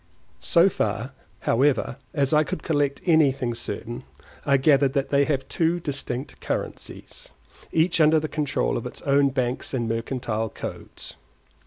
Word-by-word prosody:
So 170 Hz, +2 st, +4 dB
far, 110 Hz, -, -2 dB, 0.3 s
however, 130 Hz, 0 st, +1 dB
as 140 Hz, -1 st, 0 dB
I 155 Hz, 0 st, +5 dB
could 185 Hz, +3 st, -5 dB
collect 145 Hz, -4 st, 0 dB
anything 140 Hz, -7 st, +3 dB
certain, 120 Hz, 0 st, -5 dB, 0.4 s
I 140 Hz, -1 st, +5 dB
gathered 135 Hz, -1 st, +3 dB
that 140 Hz, -2 st, 0 dB
they 140 Hz, 0 st, +3 dB
have 135 Hz, -3 st, -1 dB
two 170 Hz, +1 st, +1 dB
distinct 140 Hz, -4 st, -4 dB
currencies, -, -, -6 dB, 0.4 s
each 165 Hz, +1 st, +2 dB
under 155 Hz, +1 st, +5 dB
the 155 Hz, -, -3 dB
control 145 Hz, -, -1 dB
of -, -, -4 dB
its -, -, -9 dB
own 140 Hz, 0 st, +3 dB
banks 130 Hz, 0 st, -2 dB
and 120 Hz, -3 st, -1 dB
mercantile 115 Hz, -1 st, -2 dB
codes. -, -, -8 dB
140 Hz, 145 wpm, -24 LUFS, 125-155 Hz, 0.4 s, I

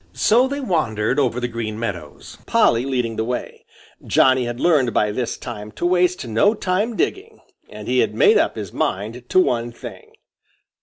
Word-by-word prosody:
So 245 Hz, +4 st, +3 dB
they 280 Hz, +1 st, -4 dB
wandered 135 Hz, -, 0 dB
over 125 Hz, -3 st, 0 dB
the 125 Hz, -, -2 dB
Green 115 Hz, -2 st, -5 dB
Meadows, 90 Hz, -10 st, -7 dB
Polly 115 Hz, +2 st, +3 dB
leading 125 Hz, -4 st, -2 dB
the 110 Hz, -, 0 dB
way. 125 Hz, +2 st, -5 dB, 0.4 s
Johnny 130 Hz, -1 st, +3 dB
had 120 Hz, 0 st, -5 dB
learned 145 Hz, -8 st, +2 dB
by 105 Hz, 0 st, +2 dB
this 120 Hz, +3 st, -3 dB
time 105 Hz, -4 st, -8 dB
to 170 Hz, -, -4 dB
waste 180 Hz, -3 st, +1 dB
no 120 Hz, -, +2 dB
time 205 Hz, +4 st, -1 dB
digging. 415 Hz, +3 st, -3 dB, 0.3 s
And -, -, -10 dB
he -, -, +1 dB
had -, -, +1 dB
made 440 Hz, -2 st, +5 dB
up -, -, 0 dB
his -, -, -7 dB
mind -, -, -3 dB
to 370 Hz, -, +4 dB
one 120 Hz, -, 0 dB
thing. 115 Hz, -, -11 dB
125 Hz, 175 wpm, -21 LUFS, 115-185 Hz, 0.4 s, made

